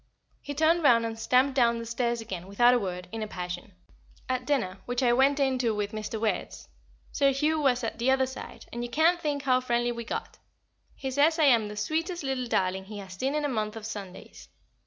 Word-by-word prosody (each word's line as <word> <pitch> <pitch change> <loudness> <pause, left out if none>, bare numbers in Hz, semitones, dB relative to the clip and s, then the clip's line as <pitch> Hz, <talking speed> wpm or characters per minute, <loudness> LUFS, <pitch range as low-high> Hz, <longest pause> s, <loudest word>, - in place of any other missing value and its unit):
He 285 - -6
turned 320 +3 +3
round 235 -6 +5
and 225 0 -5
stamped 255 +4 +3
down 235 -3 +3
the 230 - -5
stairs 235 0 -1
again, 190 -5 -6
without 240 +5 +4
a 245 - +3
word, 180 -3 -5
in 225 0 -5
a 215 - -3
passion. 180 0 -6 0.5
At 255 -1 -2
dinner, 195 -10 0
which 245 +2 -1
I 240 -1 +4
went 275 +3 +3
in 265 -2 +1
to 230 -3 +1
with 205 -1 -2
Mr. 215 0 -4
Wertz, 220 -1 -2 0.4
Sir 280 -1 +3
Hugh 305 +4 +1
was 255 -3 +2
at 225 - -4
the 240 +3 +1
other 265 0 +3
side, 260 0 -9
and 240 0 -3
you 240 - -4
can't 330 +6 +3
think 290 -2 -2
how 255 -2 +3
friendly 240 -1 0
we 235 0 -5
got. - - -5 0.6
He 265 -1 -4
says 295 +5 +3
I 320 - +3
am 235 -7 +5
the 210 0 -8
sweetest 325 - -2
little 265 -2 -2
darling 190 -3 0
he 210 +1 -8
has 190 -2 -8
seen 265 +10 -2
in 300 -1 0
a - - +2
month 215 -5 -2
of 220 -1 -7
Sundays. 200 -4 -9
240 Hz, 225 wpm, -28 LUFS, 215-275 Hz, 0.6 s, round